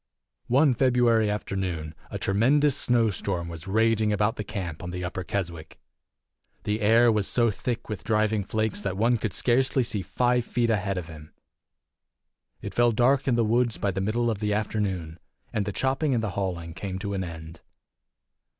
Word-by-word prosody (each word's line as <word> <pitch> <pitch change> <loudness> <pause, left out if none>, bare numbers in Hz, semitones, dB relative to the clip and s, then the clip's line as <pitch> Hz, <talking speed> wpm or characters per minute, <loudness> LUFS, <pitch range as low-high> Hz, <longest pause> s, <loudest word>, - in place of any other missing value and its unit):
One 135 +2 +4
February 120 -3 +3
afternoon 95 -6 -3 0.2
a - - -4
tremendous 135 +8 +3
snow 115 -3 +2
storm 90 -3 -2
was 85 +1 -8
raging 110 +1 +2
about 105 +2 +1
the 105 - -4
camp 90 -6 -5
on 90 - -6
the 90 0 -5
Upper 90 +1 -4
Keswick. 85 -5 -5 0.8
The 105 +1 -1
air 115 +3 +5
was 105 -3 +1
so 115 -2 +3
thick 120 +3 -4
with 105 -4 -5
driving 110 -1 +1
flakes 110 0 -1
that 95 -2 -3
one 115 +2 +2
could 110 -2 -2
scarcely 130 +6 +2
see 110 -4 -2
five 125 +6 +1
feet 115 0 0
ahead 100 -3 -1
of 90 - -3
him. 75 -1 -12 1.3
It - - -5
fell 120 0 +4
dark 125 +5 +2
in 125 - +3
the 115 -1 +2
woods 120 +1 +1
by 100 - 0
the 95 +1 -3
middle 115 +4 0
of 105 - -4
the 105 -1 0
afternoon, 95 -6 -2 0.3
and 105 -2 0
the 100 - -2
chopping 135 +5 0
and 115 - 0
the 105 - -2
hauling 90 -4 -3
came 95 +1 -5
to 100 +1 -4
an 95 -1 -2
end. 80 -1 -9
105 Hz, 180 wpm, -26 LUFS, 95-120 Hz, 1.3 s, air